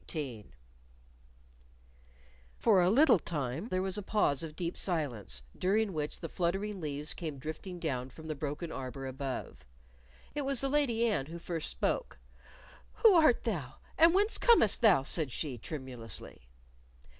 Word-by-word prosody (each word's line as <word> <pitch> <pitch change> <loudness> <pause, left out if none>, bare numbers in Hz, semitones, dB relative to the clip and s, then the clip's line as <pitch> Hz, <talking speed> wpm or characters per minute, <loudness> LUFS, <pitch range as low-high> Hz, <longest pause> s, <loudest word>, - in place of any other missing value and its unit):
CHAPTER 160 - -2
18 120 -8 -7 2.0
For 180 - +4
a 175 - +4
little 245 - +6
time 145 - -3
there 185 -4 -1
was 190 +2 -1
a - - -4
pause 190 -9 +1
of 160 -2 -6
deep 170 0 -3
silence, 120 - -3
during 200 +2 +1
which 150 -2 -4
the 165 - -4
fluttering 195 +4 -2
leaves 150 0 -2
came 155 -5 -5
drifting 155 +6 -6
down 130 -6 -2
from 160 +5 -13
the 155 - -3
broken 150 +3 -4
arbor 135 0 -6
above. 130 - -5 0.7
It 295 - -2
was 275 -2 +3
the 275 - +1
Lady 260 -5 +2
Anne 205 -12 0
who 165 +2 -7
first 170 -2 -3
spoke. - - -2 0.9
"Who 445 -3 +9
art 310 -8 +5
thou, 155 - -3 0.2
and 330 +2 +6
whence 415 +3 +3
comest 455 - +5
thou?" 200 - +5
said 150 -1 0
she, 130 -2 -4
tremulously. 120 - -7
165 Hz, 155 wpm, -32 LUFS, 135-210 Hz, 2.0 s, Who